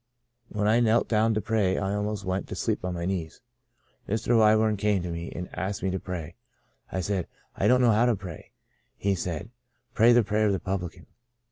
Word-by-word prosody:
When 105 Hz, -1 st, -1 dB
I 110 Hz, +2 st, +4 dB
knelt 115 Hz, 0 st, +3 dB
down 110 Hz, 0 st, +2 dB
to 110 Hz, -, 0 dB
pray 105 Hz, -3 st, +1 dB
I 95 Hz, 0 st, -1 dB
almost 105 Hz, 0 st, -2 dB
went 95 Hz, +1 st, -2 dB
to -, -, -6 dB
sleep -, -, -1 dB
on 90 Hz, -1 st, -2 dB
my 85 Hz, 0 st, -3 dB
knees. 90 Hz, -4 st, -3 dB, 0.7 s
Mr. 110 Hz, +3 st, +1 dB
Wyburn 110 Hz, -1 st, +4 dB
came 100 Hz, -2 st, +1 dB
to 90 Hz, -, -4 dB
me 85 Hz, 0 st, -5 dB
and 90 Hz, 0 st, -6 dB
asked 95 Hz, 0 st, -3 dB
me 95 Hz, -, 0 dB
to 95 Hz, -, -2 dB
pray. 85 Hz, -3 st, -6 dB, 0.6 s
I 95 Hz, -, -2 dB
said, 95 Hz, -1 st, -2 dB, 0.2 s
* -, -, -39 dB
I -, -, +1 dB
don't 125 Hz, 0 st, +5 dB
know 120 Hz, -2 st, +5 dB
how 110 Hz, +3 st, +3 dB
to 120 Hz, -, +3 dB
pray.' 90 Hz, -5 st, -9 dB, 0.5 s
He 100 Hz, 0 st, +1 dB
said, 90 Hz, +3 st, -4 dB, 0.4 s
*Pray 115 Hz, +2 st, +5 dB
the 120 Hz, -1 st, +5 dB
prayer 105 Hz, +1 st, +1 dB
of 100 Hz, -, +2 dB
the 95 Hz, -, -1 dB
publican.' 95 Hz, -3 st, -4 dB
100 Hz, 215 wpm, -27 LUFS, 90-110 Hz, 0.7 s, don't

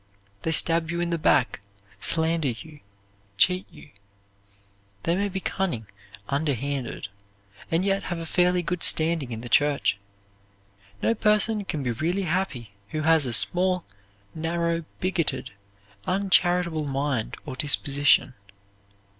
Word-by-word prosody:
They 160 Hz, -, -1 dB
stab 165 Hz, 0 st, +4 dB
you 170 Hz, +1 st, -2 dB
in 175 Hz, 0 st, -1 dB
the 170 Hz, -, -1 dB
back, 125 Hz, -, +2 dB, 0.4 s
slander 160 Hz, +3 st, +2 dB
you, 145 Hz, +5 st, -6 dB, 0.6 s
cheat 180 Hz, -, +3 dB
you. 145 Hz, -, -15 dB, 1.1 s
They 170 Hz, -, +1 dB
may 200 Hz, +2 st, 0 dB
be 190 Hz, 0 st, -3 dB
cunning, 175 Hz, -, -2 dB, 0.4 s
underhanded, 140 Hz, -5 st, -2 dB, 0.6 s
and 165 Hz, +3 st, +1 dB
yet 195 Hz, 0 st, 0 dB
have 175 Hz, -, -3 dB
a 165 Hz, -, -5 dB
fairly 180 Hz, +1 st, +2 dB
good 180 Hz, +1 st, -3 dB
standing 160 Hz, -5 st, +3 dB
in 115 Hz, -1 st, -5 dB
the 120 Hz, -, -7 dB
church. 140 Hz, -5 st, +2 dB, 1.0 s
No -, -, +3 dB
person 215 Hz, -1 st, +1 dB
can 150 Hz, -6 st, -3 dB
be 125 Hz, -, -1 dB
really 170 Hz, -, -1 dB
happy 160 Hz, -, -2 dB, 0.2 s
who 155 Hz, -, -3 dB
has 160 Hz, -3 st, +3 dB
a -, -, -2 dB
small, 180 Hz, +8 st, +3 dB, 0.5 s
narrow, 170 Hz, +1 st, -2 dB, 0.2 s
bigoted, 170 Hz, -7 st, -1 dB, 0.6 s
uncharitable 175 Hz, -4 st, +2 dB
mind 135 Hz, -4 st, -2 dB
or 130 Hz, -, -6 dB
disposition. 145 Hz, -1 st, +2 dB
165 Hz, 130 wpm, -25 LUFS, 140-180 Hz, 1.1 s, stab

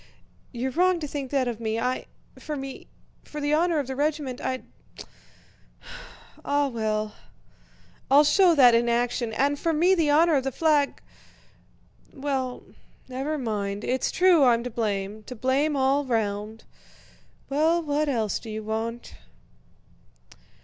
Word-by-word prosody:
You're 255 Hz, +1 st, -3 dB
wrong 360 Hz, +4 st, +2 dB
to 300 Hz, -, -4 dB
think 275 Hz, -2 st, -5 dB
that 270 Hz, -2 st, 0 dB
of 235 Hz, -2 st, -4 dB
me... 220 Hz, -1 st, -2 dB
I... 250 Hz, +2 st, -2 dB, 0.3 s
for 305 Hz, -, -5 dB
me... 270 Hz, -1 st, -7 dB, 0.4 s
for 300 Hz, -, -8 dB
the 290 Hz, 0 st, 0 dB
honor 335 Hz, +1 st, +2 dB
of 290 Hz, -, 0 dB
the 265 Hz, +1 st, -5 dB
regiment 290 Hz, -3 st, -2 dB
I'd... 255 Hz, 0 st, -3 dB, 1.8 s
Ah 285 Hz, 0 st, +1 dB
well, 215 Hz, -3 st, -2 dB, 1.0 s
I'll 285 Hz, +2 st, +7 dB
show 355 Hz, +3 st, +4 dB
that 250 Hz, -5 st, +7 dB
in 235 Hz, +1 st, +3 dB
action, 240 Hz, 0 st, 0 dB
and 280 Hz, +5 st, 0 dB
for 330 Hz, -, 0 dB
me 345 Hz, +5 st, +4 dB
the 330 Hz, -5 st, +2 dB
honor 320 Hz, +3 st, +4 dB
of 270 Hz, -3 st, +2 dB
the 270 Hz, -, -2 dB
flag... 295 Hz, 0 st, +1 dB, 1.1 s
Well, 265 Hz, -3 st, -3 dB, 0.4 s
never 270 Hz, +4 st, -3 dB
mind, 205 Hz, -5 st, -3 dB
it's 255 Hz, +1 st, 0 dB
true 360 Hz, -5 st, +4 dB
I'm 235 Hz, -2 st, +4 dB
to 250 Hz, -, -5 dB
blame, 210 Hz, -2 st, -3 dB
to 250 Hz, -, -8 dB
blame 270 Hz, +6 st, +1 dB
all 275 Hz, +1 st, +2 dB
round. 220 Hz, -3 st, -2 dB, 0.8 s
Well, 320 Hz, +4 st, +2 dB
what 300 Hz, 0 st, 0 dB
else 225 Hz, -6 st, -1 dB
do 225 Hz, -, -10 dB
you 215 Hz, 0 st, -5 dB
want?..." 225 Hz, +2 st, -4 dB
265 Hz, 145 wpm, -25 LUFS, 230-295 Hz, 1.8 s, I'll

